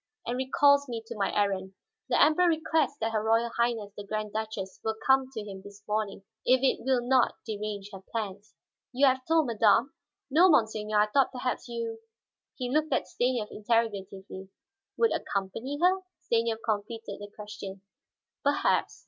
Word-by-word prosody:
"And 240 - -2
recalls 280 +2 +4
me 230 -2 -4
to - - -7
my 200 -2 0
errand. 190 -2 -1 0.3
The - - +3
Emperor 315 +4 +5
requests 315 -3 +1
that 225 +1 0
her 215 -1 0
Royal 230 +1 +2
Highness 230 -4 0
the 205 - -7
Grand 215 0 -4
Duchess 215 -3 -4
will 220 0 -1
come 265 -1 +4
to 220 -5 -5
him 195 -2 -8
this 200 +1 -13
morning, 210 -2 -2 0.2
if 255 +1 +4
it 270 - +2
will 255 -1 +2
not 255 -2 +3
derange 210 -2 -5
her 190 - -8
plans." 210 -2 -5 0.4
"You 270 +2 +3
have 260 -1 +3
told 320 -1 +4
madame?" 230 +3 +3 0.4
"No, 345 +6 +6
monseigneur. 215 -6 +2
I - - +5
thought 265 +6 +2
perhaps 250 -1 -3
you 230 -1 -4 0.3
" - - -64
he 250 -1 -3
looked 310 +1 +1
at - - +1
Stanief 245 -3 0
interrogatively. 200 -4 -2 0.5
"Would 460 - +3
accompany 210 +8 -3
her?" 370 +2 +3 0.2
Stanief 230 -1 +1
completed 215 -1 -3
the 205 0 -8
question. 195 -2 -8 0.6
"Perhaps." 285 0 +1
225 Hz, 165 wpm, -28 LUFS, 205-260 Hz, 0.6 s, No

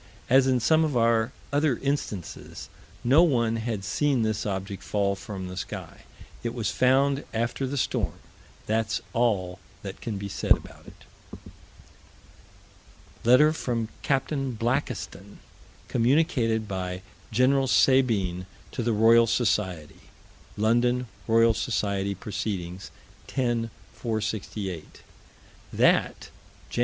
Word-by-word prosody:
As 135 0 +6
in 130 -1 +3
some 155 +7 +4
of 150 -5 0
our 115 0 +3 0.2
other 145 -4 +2
instances, 135 - -4 0.3
no 135 +7 +6
one 120 -9 +2
had 110 -3 -3
seen 135 +4 +1
this 110 -1 -1
object 95 0 -4
fall 100 -1 0
from 95 -1 -7
the 90 - -7
sky. 90 - -7 0.4
It 120 0 -4
was 115 -4 -1
found 135 +2 +3
after 120 +4 -1
the 140 +2 -3
storm: - - -1 0.5
that's 110 0 0
all 100 -7 0 0.2
that 100 -1 -7
can 110 -4 -4
be 100 +1 -5
said 100 - +3
about - - -15
it. - - -15 2.2
Letter 130 +6 +6
from 115 -7 -2
Capt. 135 0 0
Blakiston, 120 - -3 0.5
communicated 120 -4 +2
by 90 -1 -4 0.3
Gen. 130 +4 +3
Sabine, 105 -10 +3 0.2
to - - -3
the 115 0 +1
Royal 115 +2 +6
Society 95 -9 -1 0.5
(London 120 +3 +2 0.2
Roy. 115 0 +5
Soc. 100 -2 -1 0.2
Proc., 105 - -8
10 95 -2 -4 1.0
468): 105 -6 -4 0.7
That, - - +2 0.4
Jan. - - -3
115 Hz, 115 wpm, -26 LUFS, 100-130 Hz, 2.2 s, As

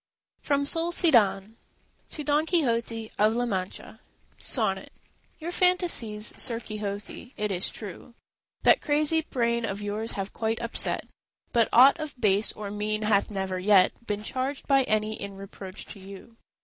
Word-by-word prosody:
FROM 280 -1 +1
SOLISDAN 240 - +2 0.5
To 300 - -5
Don 300 +2 +2
Quixote 230 -9 0
of 215 +2 +4
La 245 +1 +1
Mancha 190 -5 -4 0.4
SONNET - - 0 0.5
Your 335 +2 -5
fantasies, 345 - +1
Sir 235 -3 +1
Quixote, 215 +2 -6
it 210 -1 -1
is 185 -1 -1
true, 215 +3 -10 0.5
That - - +6
crazy 305 +1 +2
brain 235 -5 0
of 200 -3 -2
yours 210 +2 -2
have 195 0 -4
quite 225 0 -1
upset, 235 0 -2 0.5
But 230 -2 +3
aught 270 +7 +7
of 305 -4 -6
base 205 0 +3
or 205 -1 -6
mean 215 +1 -2
hath 210 -2 +2
never 190 -2 -3
yet 190 -1 +5 0.2
Been 210 0 -2
charged 265 +5 -3
by 275 -2 +4
any 215 -1 0
in 200 -1 -6
reproach 195 -1 -9
to 205 - -14
you. 195 +4 -12
220 Hz, 150 wpm, -27 LUFS, 205-270 Hz, 0.5 s, aught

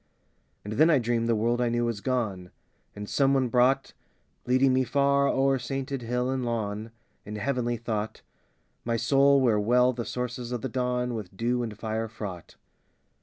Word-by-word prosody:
And 105 - -5
then 155 +8 +4
I 155 - +5
dreamed 120 -1 0
the 115 - +3
world 120 +3 +1
I 120 - +2
knew 120 0 0
was 115 -4 -3
gone, 105 -9 -2 0.5
And 105 0 -7
some 135 +3 +2
one 130 -2 +1
brought, 130 +3 +2 0.5
Leading 130 +1 +4
me 130 0 +3
far 140 +2 +2
o'er 135 0 +2
sainted 135 0 -4
hill 125 +2 -1
and 130 -1 -2
lawn, 110 -2 -3 0.3
In 105 +1 -7
heavenly 120 +1 -1
thought, 110 -2 -4 0.6
My 115 0 -1
soul 140 +3 +4
where 115 -5 +3
well 125 +4 +3
the 120 -1 -4
sources 125 0 -4
of 120 -2 -3
the 130 - -3
dawn 125 0 -1
With 100 -4 -7
dew 120 +3 0
and 110 -3 -5
fire 110 +1 -3
fraught. 100 -6 -8
120 Hz, 175 wpm, -27 LUFS, 110-130 Hz, 0.6 s, I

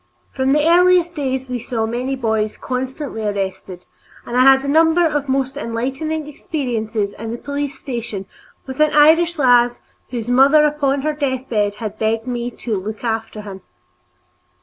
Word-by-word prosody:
From 265 +1 +1
our 330 +4 +4
earliest 360 -1 +4
days 265 -4 -3
we 250 -1 -3
saw 225 -1 -2
many 250 +4 -2
boys 220 -4 -1
constantly 260 -1 -4
arrested, 195 -3 -4 0.4
and 240 - -5
I 250 - +5
had 270 +1 +6
a - - -3
number 325 +3 +4
of 295 -3 -1
most 265 0 0
enlightening 270 +6 -3
experiences 230 -9 -3
in 225 +1 -5
the 235 - -4
police 285 +1 -4
station 235 -7 -5 0.4
with 265 +1 -8
an 305 0 +4
Irish 325 +3 +5
lad 245 -3 +4 0.3
whose 235 -3 -5
mother 275 +5 +5
upon 285 -2 0
her 305 0 0
deathbed 255 -8 -1
had 215 0 -6
begged 225 +1 0
me 245 -1 -3
"to 225 -4 -4
look 215 +4 -7
after 225 -2 -3
him." 195 -2 -9
255 Hz, 160 wpm, -19 LUFS, 225-290 Hz, 0.4 s, had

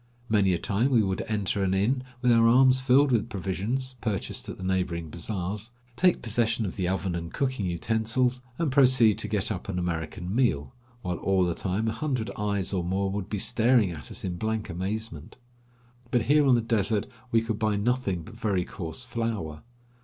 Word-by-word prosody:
Many 100 -3 +3
a - - +1
time 105 +9 0
we 120 -5 +4
would 95 -1 -1
enter 100 -2 0
an 95 0 +1
inn 125 +7 +1 0.2
with 125 - +5
our 115 0 +5
arms 130 +2 +5
filled 135 +2 +4
with 115 -1 +1
provisions, 110 +7 -3
purchased 105 -5 -3
at - - -6
the - - -8
neighboring 90 -4 -1
bazaars, 100 +5 -4 0.3
take 180 -2 +3
possession 115 0 +1
of 95 - -4
the 90 -2 -1
oven 95 0 -1
and 85 -1 -4
cooking 130 -8 -1
utensils, 115 +8 0 0.2
and 165 -5 0
proceed 130 -5 +5
to - - -1
get 105 0 0
up 95 0 -5
an 95 - -2
American 90 +1 -3
meal, 75 - +1 0.3
while 90 -2 -2
all 95 -2 +2
the 85 - 0
time 95 +6 -2
a - - +1
hundred 130 -4 -2
eyes 100 -2 -1
or 90 -2 0
more 95 +2 -1
would 100 -1 -4
be 105 - -2
staring 115 -1 +3
at 75 -5 -8
us - - -8
in 90 -2 -3
blank 110 +2 -2
amazement. 95 -2 -5 0.7
But 120 -2 +2
here 145 +3 +4
on 130 - +6
the 120 - +2
desert 110 -2 +1 0.3
we 115 -1 +3
could 115 -2 -3
buy 110 -1 +1
nothing 100 -5 0
but 110 - -12
very 105 -6 -1
coarse 100 +4 -6
flour. 115 -11 -3
105 Hz, 195 wpm, -27 LUFS, 95-120 Hz, 0.7 s, on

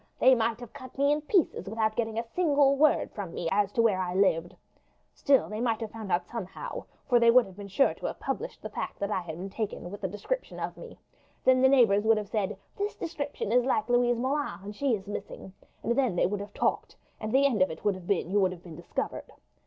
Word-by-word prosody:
"They 260 - +6
might 230 -1 +1
have 240 - -10
cut 255 0 -11
me 280 +1 +3
in 295 +1 +1
pieces 310 - +1
without 220 0 0
getting 225 -2 -2
a 230 - 0
single 285 -5 +4
word 300 +1 +3
from 195 -5 -6
me 170 - -3
as 200 0 +2
to 230 - +3
where 205 -5 +3
I 180 0 -3
lived. 175 -3 +2 0.6
Still 275 -2 +3
they 215 +1 -4
might 230 -3 +1
have 225 -2 -5
found 220 -4 -7
out 175 0 +1
somehow, 230 - -6 0.2
for 245 -2 +5
they 235 0 +5
would 250 +1 +6
have 190 - -13
been 200 0 -8
sure 200 +8 +3
to - - -5
have - - -6
published - - -4
the - - -5
fact - - -5
that 200 +1 -3
I 190 - 0
had 165 -2 -7
been 190 +2 -6
taken, 200 -4 -4
with 205 0 -9
a - - +1
description 210 - -4
of - - -4
me. - - -11 0.5
Then 255 0 +5
the 265 - +6
neighbours 225 -7 +5
would 220 0 +4
have 210 -2 -4
said, 210 -4 -1 0.2
'This 410 0 -3
description 290 - -4
is 245 +1 +4
like 230 -3 0
Louise 245 0 +3
Moulin, 275 0 -2
and 205 +1 -7
she 270 0 +1
is 195 -2 -9
missing;' 200 -2 -7 0.3
and 235 - +1
then 255 -8 +1
they - - +3
would 200 +3 -1
have 205 +1 -8
talked, - - -1 0.2
and 215 - -4
the 270 +3 +4
end 240 -8 +2
of 185 - +4
it 160 - -9
would 205 - +3
have 185 -2 -10
been 190 -3 0
you 205 - +3
would 190 -2 +3
have 175 -1 -13
been 170 -3 -10
discovered. - - -5
220 Hz, 250 wpm, -28 LUFS, 195-260 Hz, 0.6 s, They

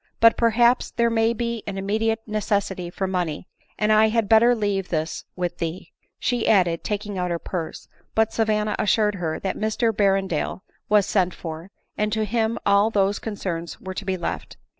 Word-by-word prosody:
But 230 -1 +7
perhaps 235 +2 +3
there 235 -1 +1
may 225 0 +3
be 235 -1 -2
an 200 -1 -4
immediate 220 +3 0
necessity 200 -4 -1
for 190 +2 -3
money, 180 -4 -2 0.3
and 215 0 +3
I 215 +1 +6
had 220 -1 +1
bet 220 0 +6
ter 240 +1 +5
leave 200 -4 -1
this 160 -1 -2
with 180 -1 -3
thee," 170 +2 -4 0.3
she 245 -3 -1
added, 175 -5 +3
taking 205 -2 -3
out 180 0 -1
her 170 - 0
purse; 170 -1 -5 0.3
but 220 0 +2
Savanna 215 -1 +1
assured 210 0 +2
her 160 -2 -2
that 190 - -2
Mr 220 +2 +1
Berrendale 195 -4 0 0.3
was 210 -2 +5
sent 185 -4 +1
for, 165 +2 -7 0.3
and 210 0 +1
to 220 -1 0
him 225 +1 0
all 200 +2 +4
those 200 -2 +1
concerns 170 -7 -5
were 190 -1 -6
to 200 - -5
be 190 -1 -1
left. 175 - -5
205 Hz, 180 wpm, -23 LUFS, 185-220 Hz, 0.3 s, But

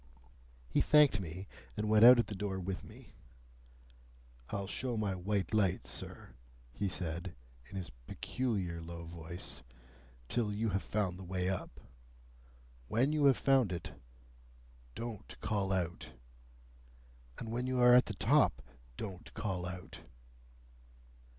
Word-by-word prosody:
He 65 - +2
thanked 150 -7 +6
me, 90 +1 -6 0.3
and 105 0 -1
went 110 0 +5
out 125 +1 +11
at 120 - +3
the - - -6
door 95 -1 -3
with 95 0 -4
me. - - -14 1.4
"I'll 100 -2 -2
show 120 +4 -2
my 105 -3 0
white 95 +1 -1
light, 95 - +2
sir," 60 -1 -6 0.4
he 100 +10 -1
said, 85 +1 -3 0.3
in 95 - -10
his 90 -7 -4 0.2
peculiar 95 -10 -2
low 85 0 -7
voice, 85 +1 -6 0.7
"till 115 - 0
you 110 +2 0
have 95 0 0
found 95 -4 -1
the - - -7
way 90 0 -1
up. 95 - -4 1.1
When 130 +7 +2
you 150 -2 +3
have 135 -3 +6
found 135 -7 +3
it, 85 - -5 1.0
don't 115 -3 -7
call 100 -3 -1
out! 90 -3 -2 1.2
And 110 - -5
when 125 +2 -1
you 130 0 0
are 125 0 +8
at 125 +1 +7
the - - -4
top, 65 +2 +3 0.3
don't 95 -4 -6
call 95 -4 -2
out!" 90 0 -7
95 Hz, 135 wpm, -34 LUFS, 90-115 Hz, 1.4 s, out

